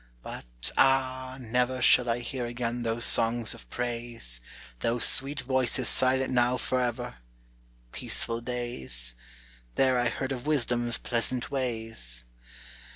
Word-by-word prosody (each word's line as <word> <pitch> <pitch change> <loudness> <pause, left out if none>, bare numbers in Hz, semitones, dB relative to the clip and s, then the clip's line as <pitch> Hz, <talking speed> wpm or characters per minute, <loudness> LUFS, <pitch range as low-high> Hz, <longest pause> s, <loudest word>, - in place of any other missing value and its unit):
but, - - -3
ah, 130 -1 +2
never 125 +1 -1
Shall 125 0 +4
I 115 +1 0
hear 125 0 -4
again 120 0 -3
those 115 0 0
songs 115 0 +4
of - - -13
praise, 120 - -5 0.4
Those 115 - +1
sweet 140 +2 +4
voices 130 -1 +1
silent 130 0 +2
now 125 0 +2
forever! 125 - -2 0.7
Peaceful 115 0 -1
days! 65 - -3 0.6
There 130 -2 +3
I 120 -1 +2
heard 130 +3 -4
of 130 +1 -5
Wisdom's 120 -5 +1
pleasant 120 +2 -2
ways. 115 - -4
120 Hz, 120 wpm, -27 LUFS, 115-130 Hz, 0.7 s, Shall